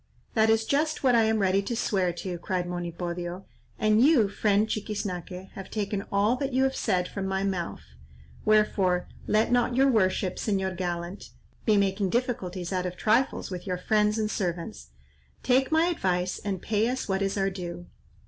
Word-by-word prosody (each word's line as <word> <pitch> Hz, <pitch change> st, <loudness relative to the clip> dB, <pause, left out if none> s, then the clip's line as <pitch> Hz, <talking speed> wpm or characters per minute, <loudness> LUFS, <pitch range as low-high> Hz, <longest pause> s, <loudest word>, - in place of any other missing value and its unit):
"That 220 Hz, -1 st, +3 dB
is 225 Hz, 0 st, +3 dB
just 305 Hz, +4 st, 0 dB
what 255 Hz, -2 st, +4 dB
I 230 Hz, -2 st, +5 dB
am 220 Hz, 0 st, +2 dB
ready 195 Hz, -1 st, +2 dB
to 235 Hz, +4 st, -3 dB
swear 195 Hz, -6 st, +1 dB
to," 175 Hz, 0 st, -5 dB
cried 180 Hz, -1 st, -2 dB
Monipodio; 175 Hz, +1 st, -4 dB, 0.3 s
"and 215 Hz, +1 st, +3 dB
you, 265 Hz, -9 st, +5 dB
friend 205 Hz, +1 st, +2 dB
Chiquiznaque, 195 Hz, -4 st, -4 dB
have 195 Hz, -, -9 dB
taken 205 Hz, -2 st, -2 dB
all 205 Hz, +4 st, +3 dB
that 275 Hz, 0 st, -3 dB
you 260 Hz, +1 st, +3 dB
have 265 Hz, 0 st, +1 dB
said 180 Hz, -5 st, 0 dB
from 195 Hz, -1 st, -4 dB
my 190 Hz, 0 st, -1 dB
mouth; 185 Hz, -3 st, -3 dB, 0.6 s
wherefore 200 Hz, -4 st, +2 dB, 0.2 s
let 215 Hz, +2 st, +2 dB
not 245 Hz, 0 st, +2 dB
your 270 Hz, +1 st, +4 dB
worship, 185 Hz, -4 st, +1 dB
Señor 190 Hz, -3 st, -1 dB
gallant, 175 Hz, +1 st, -4 dB, 0.4 s
be 215 Hz, -2 st, +4 dB
making 195 Hz, 0 st, +1 dB
difficulties 190 Hz, -7 st, -2 dB
out 180 Hz, -1 st, 0 dB
of 180 Hz, 0 st, -7 dB
trifles 225 Hz, 0 st, +1 dB
with 180 Hz, +1 st, -6 dB
your 180 Hz, -1 st, -1 dB
friends 210 Hz, +3 st, +2 dB
and 215 Hz, -1 st, -1 dB
servants. 170 Hz, -, -4 dB, 0.5 s
Take 260 Hz, +2 st, +2 dB
my 320 Hz, +1 st, +4 dB
advice 185 Hz, -, 0 dB
and 195 Hz, -3 st, -4 dB
pay 220 Hz, 0 st, +1 dB
us 255 Hz, +1 st, -3 dB
what 190 Hz, -1 st, 0 dB
is 195 Hz, +1 st, -1 dB
our 195 Hz, 0 st, +1 dB
due. 175 Hz, -2 st, -6 dB
200 Hz, 175 wpm, -27 LUFS, 180-220 Hz, 0.6 s, I